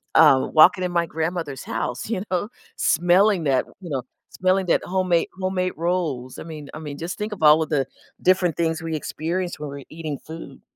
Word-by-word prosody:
um, 150 -5 +6
walking 180 +4 +6
in 180 - -1
my 170 -1 +1
grandmother's 160 -3 -3
house, 120 - -3
you 220 -5 -1
know, 185 +4 0 0.3
smelling 180 +3 +3
that, 135 -3 +2 0.2
you 175 - -8
know, 135 -3 -2 0.3
smelling 185 +1 +1
that - - +3
homemade 180 -2 +1
homemade 185 -1 -1
rolls, 160 -7 -2
I - - -6
mean 155 -3 -9
I 155 - -7
mean 145 -2 -7
just 170 +3 -5
think 210 0 -3
about 160 -7 +3
all 160 - 0
the 140 -4 +1 0.4
different 180 -3 +3
things 165 -1 0
we 165 -1 -3
experience 170 +3 -3
when 150 - -5
we're 140 0 -8
eating 155 -3 -5
food. 160 +1 -10
165 Hz, 190 wpm, -23 LUFS, 150-185 Hz, 0.4 s, um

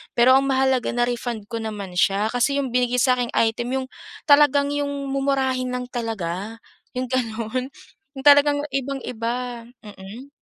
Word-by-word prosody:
Pero 255 +3 +6
ang 275 - -1
mahalaga, 265 -2 +1
na-refund 240 -3 -2
ko 230 - -3
naman 200 -5 -5
siya, 200 +3 +2
kasi 245 +3 +1
'yung 270 -3 -2
binigay 250 0 +1
sa 250 0 +3
aking 245 -1 -2
item, 230 +2 +1
'yung 260 -1 -2 0.4
talagang 285 -1 +4
'yung 285 -1 -3
mumurahin 265 -2 0
lang 250 - -3
talaga, 220 -2 -4 0.3
'yung 255 -1 -3
gano'n, 235 0 -2 0.5
'yung 265 - -8
talagang 285 0 +6
ibang-iba, 245 -3 -4 0.2
mm. 210 +6 -11
250 Hz, 145 wpm, -22 LUFS, 230-270 Hz, 0.5 s, Pero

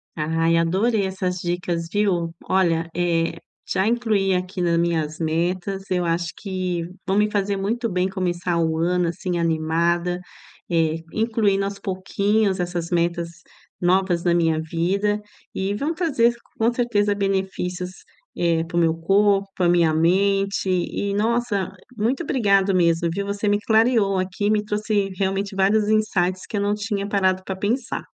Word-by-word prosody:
Ai, 165 +1 +1
adorei 195 +6 +2
essas 185 -1 -3
dicas, 175 -1 -2
viu. 185 -5 +1 0.2
Olha, 170 -3 +2
eh, 170 -1 +1 0.3
já 190 +2 +1
incluí 215 -5 +1
aqui 180 +1 -3
na 170 -1 +2
minhas 160 -2 0
metas, 180 +4 -2
eu 180 -1 0
acho 165 0 -1
que 185 -3 -3 0.2
vão 190 +1 +1
me 210 0 +2
fazer 200 -1 0
muito 230 +5 -1
bem, 180 -1 0
começar 180 -2 -1
o 160 -1 +1
ano 175 +1 +1
assim 175 +1 -2
animada, 170 +2 0 0.5
eh, 165 -2 +1
incluindo 215 -3 +1
aos 200 0 -5
pouquinhos 200 +1 0
essas 175 -1 -3
metas 170 0 0 0.5
novas 180 -1 +2
na 175 -1 +3
minha 165 -2 +2
vida, 190 +6 0 0.3
e 190 +1 -1
vão 290 +10 -2
trazer, 265 -9 +2 0.2
com 225 +1 +3
certeza, 210 -4 +1
benefícios, 190 -2 -2 0.5
eh, 165 -1 +2
para 170 - -4
o - - +5
meu 165 -1 +3
corpo, 195 +3 +2
pra 180 -2 +2
minha 170 -2 +3
mente 195 +4 +2
e 185 +2 -1
nossa, 215 -3 0 0.3
muito 235 +8 0
obrigado 200 - +2
mesmo, 170 -1 +2
viu. 200 +4 -3
Você 200 +1 -2
me 205 0 +3
clareou 220 -2 +3
aqui, 190 +3 -1
me 210 -1 +2
trouxe 210 -1 -1
realmente 195 +1 -1
vários 205 +2 +2
insights, 185 -4 +1
que - - -7
eu - - 0
não 205 +1 +1
tinha 205 -1 -3
parado 190 -2 +1
pra 190 - -4
pensar. 225 +5 -2
190 Hz, 155 wpm, -22 LUFS, 170-205 Hz, 0.5 s, o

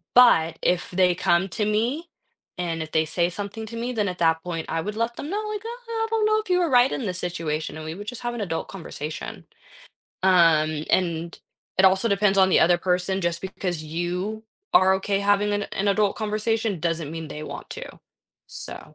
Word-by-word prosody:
But 170 -10 +6
if 180 -1 +1
they 180 -1 +3
come 175 +1 +2
to 210 - -1
me 240 +11 0 0.5
and 170 -2 -2
if 155 - -10
they 160 0 +2
say 170 +2 0
something 205 +4 -5
to 230 - -8
me, 240 +2 -3
then 210 -3 0
at 180 - -6
that 160 -1 +3
point, 170 -2 -4
I 165 - -1
would 210 +4 -4
let 230 +1 -1
them 290 - -5
know, 415 +4 -2
like, 420 -1 -4
"Uh, - - -3 0.2
I 450 -1 -1
don't 445 -1 +1
know 430 0 +3
if 435 - -7
you 360 0 +3
were 345 -2 +1
right 250 0 +5
in 250 - -3
this 185 -2 -3
situation," 160 -4 -3
and 155 - -7
we 160 - -4
would 205 +3 -9
just 245 0 -6
have 240 0 -2
an 235 - -4
adult 165 -5 -3
conversation. 155 -4 -7 0.8
Um, 160 -4 +4
and 170 -2 0 0.4
it 190 - +5
also 190 +4 +3
depends 200 -1 +2
on 190 -1 +6
the - - +5
other 175 +1 +5
person 180 +2 0
just 170 0 0
because 180 -4 -4
you 180 +7 -3 0.3
are 190 +1 +6
okay 195 +1 0
having 205 +1 +2
an 205 0 0
an 200 +1 0
adult 200 0 +2
conversation 215 -1 -1
doesn't 165 -2 -1
mean 165 0 -5
they 150 - -7
want - - -8
to. - - -8 0.5
So - - -9
190 Hz, 210 wpm, -24 LUFS, 170-220 Hz, 0.8 s, But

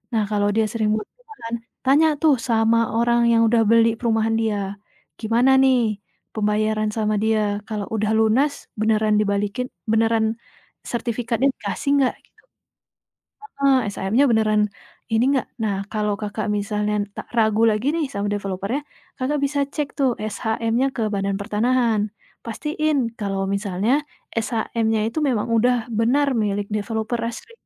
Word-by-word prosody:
Nah, 220 - +2
kalau 205 -1 +1
dia 225 - +3
sering 215 -1 0
buat 215 -1 -3
perumahan, 440 - -11 0.3
tanya 285 +4 +5
tuh 300 -6 +4
sama 225 -1 +2 0.2
orang 235 0 +3
yang 230 0 +4
udah 225 0 +3
beli 230 0 +4
perumahan 225 -2 +1
dia, 205 -3 -2 0.4
"gimana 240 +4 +3
nih 245 -6 +3 0.3
pembayaran 215 0 0
sama 215 -1 0
dia 215 -2 +1
kalau 210 -2 -3
udah 215 -1 0
lunas 240 +7 +2
beneran 215 -1 +2
dibalikin 205 +4 -1 0.2
beneran 225 0 +2 0.5
sertifikatnya 235 +2 -1
dikasih 215 +5 -4
enggak," 260 - +2
gitu. - - -29 1.0
Ah 430 - -13
hah, 275 -1 +4
SHM-nya 205 +7 +1
beneran 215 -2 +3 0.5
ini 225 +1 +2
enggak. 265 - -1 0.2
Nah, 205 -2 0
kalau 210 -1 -1
Kakak, 210 +1 -3
misalnya 210 0 -1 0.2
tak - - -6
ragu 220 -1 +3
lagi 220 +4 +2
nih 330 -2 0
sama 200 0 -2
developer-nya 200 +5 -2 0.4
Kakak, 280 +3 -1
bisa 280 +1 0
cek 285 0 -5
tuh 265 -3 +2
SHM-nya 225 +4 -1
ke 220 -3 -1
Badan 195 0 -1
Pertanahan. 215 0 +1 0.3
Pastiin 295 +1 -1
kalau 195 -2 -2
misalnya 200 +6 0 0.3
SHM-nya 225 -1 -1
itu 315 - -2
memang 250 -7 0
udah 235 0 +2
benar 250 +6 +2
milik 205 -1 -1
developer 220 +2 -2
asli. 230 - -5
225 Hz, 140 wpm, -22 LUFS, 210-245 Hz, 1.0 s, tanya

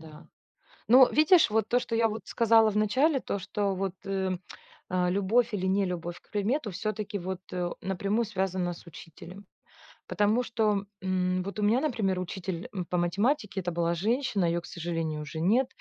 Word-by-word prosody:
да. 155 -1 -13 0.6
Но 255 +2 +8
видишь, 310 +2 +5
вот 220 0 +1
то, 245 +2 +2
что 240 -1 -3
я 225 0 +3
вот 220 0 -5
сказала 225 -1 +4
в 210 - -2
начале, 265 +8 +2
то, 200 - -3
что 195 +1 -2
вот, 190 -1 -2
э, 190 -2 -1 0.5
а, 180 -1 +1
любовь 210 +5 +1
или 190 -2 -1
нелюбовь 180 -3 -1
к - - -31
предмету 215 +3 -1
всё-таки 210 +2 -3
вот 185 0 -4 0.4
напрямую 200 +4 -1
связана 190 -4 -2
с 170 - -14
учителем. 175 +4 -12 0.6
Потому 205 +6 +2
что, 215 -4 0 0.2
м, 185 -1 0
вот 200 +3 -7
у 210 - -1
меня, 220 +5 +3
например, 220 -11 0
учитель, 185 -1 -5
м, 185 -3 -3
по 180 +1 -2
математике- 200 - 0
это 175 -1 -3
была 170 0 0
женщина, 220 - 0
ее, 170 0 +1
к 170 - -12
сожалению, 165 -3 -3
уже 155 +2 -6
нет, 225 +10 +3
195 Hz, 175 wpm, -28 LUFS, 180-220 Hz, 0.6 s, Но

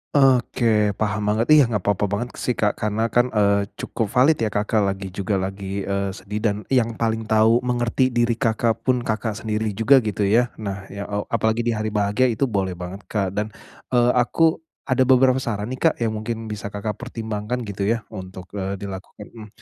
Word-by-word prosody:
Oke, 120 -5 +3
paham 105 0 -1
banget, 110 +2 +1
iya, 150 -1 +8
enggak 105 -5 -2
papa 100 0 +1
banget 115 +5 -3
sih, 125 - -2
Kak, 105 -1 +2
karena 105 +1 0
kan, 120 +1 +3
eee, 100 -2 +2
cukup 110 -3 -3
valid 130 +5 +3
ya, 110 - +1
Kakak 105 +1 0
lagi 95 -1 -5
juga 100 +1 -1
lagi, 95 +1 -4
eee, 100 0 -1
sedih, 100 +2 -6
dan 105 -2 +1
yang 115 -4 +1
paling 110 -1 -1
tahu, 110 +2 +4
mengerti 125 +1 +1
diri 120 -1 +1
Kakak 115 -1 0
pun, 125 -2 0
Kakak 110 0 -2
sendiri 110 -1 -2
juga, 115 +7 +4
gitu 105 -2 -1
ya. 115 +5 +3
Nah 100 -2 -6
ya, 100 +1 -6
e 105 - -5
apalagi 110 0 +1
di 120 - -1
hari 110 0 -2
bahagia 105 +4 +2
itu 125 +2 +1
boleh 95 -4 -1
banget, 90 +3 -8
Kak, 100 -3 -1
dan, 105 0 -2 0.4
eee, 120 0 +4
aku 160 +7 +3 0.3
ada 130 0 +3
beberapa 130 0 +5
saran 110 -4 -3
nih, 130 - -4
Kak, 165 - +4
yang 110 -2 0
mungkin 110 0 -4
bisa 105 -2 -6
Kakak 105 0 -4
pertimbangkan 115 0 -4
gitu 100 -3 -4
ya, 115 +2 +1
untuk, 95 -1 -9
eee, 95 0 -2
dilakukan, 100 +1 -8
mhm. 110 -2 -11
110 Hz, 195 wpm, -22 LUFS, 100-120 Hz, 0.4 s, iya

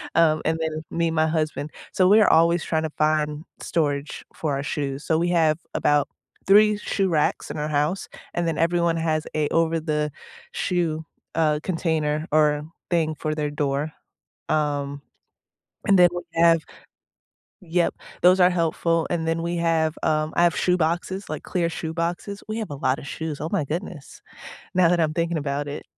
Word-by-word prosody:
Um, 155 -2 +4
and 160 +1 +1
then 155 -1 -3
me 170 0 +1
and 165 - -2
my 155 0 +3
husband. 155 -2 -2 0.2
So 185 - +4
we're 210 +1 +6
always 170 +1 +4
trying 160 -1 -1
to 160 - -2
find 155 0 +1 0.2
storage 145 -3 -2
for 150 -3 -2
our 140 - -3
shoes. 140 -1 -3
So 160 - +2
we 175 +1 +1
have 160 -3 +3 0.2
about 145 -1 +2 0.4
3 210 +2 +6
shoe 195 -2 -1
racks 155 -3 0
in - - -6
our 150 0 -2
house, 150 +6 0 0.3
and 175 -1 -1
then 160 -1 -1
everyone 170 0 +2
has 155 -1 -1
a 155 -1 +1
over-the-shoe, 160 +1 -2 0.3
uh, 155 -2 +2
container 160 -3 -1
or 150 -1 +3 0.3
thing 160 -3 +1
for 155 0 -3
their 150 -1 -1
door. 145 +1 -1 0.6
Um, 145 -2 -1 0.9
And 195 - +5
then 175 -1 +7
we 175 - -3
have, 165 0 +5 1.0
yup, 175 -1 0 0.3
those 180 +1 +6
are 180 - +7
helpful 165 -1 0
and 170 -2 -1
then 165 0 0
we 170 +1 -2
have, 165 -2 +1
um, 155 0 +1
I 175 - +4
have 170 -2 +3
shoe 180 0 +2
boxes, 175 +4 -2
like, - - -5
clear 175 -3 -1
shoe 160 -1 -5
boxes. 175 +5 -3
We 215 - -2
have 215 - -4
a - - -4
lotta 135 0 -1
shoes, 155 +1 -5
oh, 155 - -3
my 145 - 0
goodness. 165 -1 -6 0.5
Now 180 -2 +4
that 175 0 +2
I'm 155 -1 +1
thinking 170 0 0
about 145 0 -2
it. 145 - -6
160 Hz, 175 wpm, -24 LUFS, 150-170 Hz, 1.0 s, then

